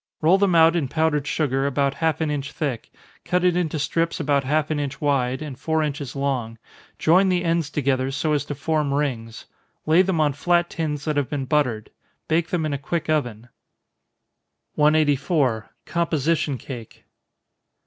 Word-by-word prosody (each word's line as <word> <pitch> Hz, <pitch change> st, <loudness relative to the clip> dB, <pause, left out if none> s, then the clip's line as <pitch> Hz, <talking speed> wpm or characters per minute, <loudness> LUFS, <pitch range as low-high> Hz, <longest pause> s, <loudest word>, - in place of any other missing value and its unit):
Roll 170 Hz, +5 st, +4 dB
them 195 Hz, -3 st, +3 dB
out 165 Hz, +1 st, +6 dB
in 160 Hz, -6 st, 0 dB
powdered 150 Hz, 0 st, 0 dB
sugar, 140 Hz, -3 st, 0 dB
about 140 Hz, 0 st, +1 dB
half 160 Hz, +2 st, -1 dB
an 155 Hz, -2 st, 0 dB
inch 140 Hz, -1 st, -3 dB
thick, 135 Hz, -7 st, -3 dB, 0.3 s
cut 180 Hz, 0 st, 0 dB
it 180 Hz, -1 st, +3 dB
into 165 Hz, -3 st, -1 dB
strips 165 Hz, +3 st, -1 dB
about 140 Hz, -3 st, +1 dB
half 150 Hz, +3 st, 0 dB
an 155 Hz, -, 0 dB
inch 140 Hz, -2 st, -4 dB
wide, 135 Hz, -1 st, 0 dB
and 140 Hz, -4 st, -8 dB
four 160 Hz, +2 st, 0 dB
inches 145 Hz, -3 st, -4 dB
long, 130 Hz, -5 st, -2 dB, 0.4 s
join 185 Hz, +4 st, +4 dB
the 180 Hz, -1 st, +1 dB
ends 165 Hz, -3 st, 0 dB
together, 135 Hz, -3 st, 0 dB
so 145 Hz, +3 st, -1 dB
as 145 Hz, -, +1 dB
to 145 Hz, -, -5 dB
form 150 Hz, -2 st, 0 dB
rings 120 Hz, -6 st, -3 dB, 0.4 s
lay 160 Hz, +3 st, +5 dB
them 190 Hz, -3 st, 0 dB
on 150 Hz, -2 st, +2 dB
flat 175 Hz, +4 st, +1 dB
tins 150 Hz, -3 st, -3 dB
that 155 Hz, -2 st, -1 dB
have 145 Hz, -3 st, 0 dB
been 140 Hz, -3 st, -3 dB
buttered 125 Hz, -7 st, 0 dB, 0.4 s
bake 165 Hz, +1 st, +1 dB
them 170 Hz, -3 st, -1 dB
in 150 Hz, -, -2 dB
a 140 Hz, -, -2 dB
quick 160 Hz, +2 st, -2 dB
oven. 120 Hz, -6 st, -2 dB, 1.2 s
184. 145 Hz, -5 st, +2 dB, 0.2 s
_Composition 160 Hz, -4 st, 0 dB
Cake. 120 Hz, -5 st, -10 dB
150 Hz, 170 wpm, -23 LUFS, 135-160 Hz, 1.2 s, out